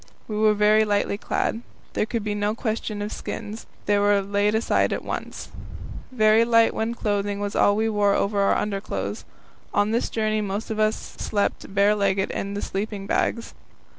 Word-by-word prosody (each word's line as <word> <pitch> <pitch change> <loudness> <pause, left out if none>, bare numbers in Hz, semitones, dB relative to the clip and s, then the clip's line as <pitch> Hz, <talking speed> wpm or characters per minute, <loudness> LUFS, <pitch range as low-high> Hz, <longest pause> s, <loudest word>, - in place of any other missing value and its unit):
We 215 - -4
were 215 0 +4
very 210 +1 +5
lightly 205 -1 0
clad. 225 - -1 0.3
There 215 - 0
could 230 -2 -2
be 210 0 -2
no 205 +1 -1
question 220 -2 -3
of 210 - -4
skins; 215 +1 -6 0.2
they 205 0 +3
were 205 0 +4
laid 205 +2 +1
aside 220 - +2
at - - -2
once. - - -5 0.6
Very 220 -2 +4
light 230 -1 +4
wind 230 +2 -2
clothing 205 -2 -1
was 205 0 -3
all 205 - +4
we 220 +1 +1
wore 205 -2 +2
over 200 0 0
our 195 - +3
underclothes. 205 -1 -3 0.5
On 205 +1 +2
this 235 +2 0
journey 215 -1 0
most 205 +2 -3
of 215 - -3
us 215 0 +3
slept 205 -1 -3
barelegged 200 -1 +2
in 200 +1 -4
the 205 - -3
sleeping 200 0 -3
bags. 230 +3 -1
210 Hz, 175 wpm, -24 LUFS, 205-220 Hz, 0.6 s, very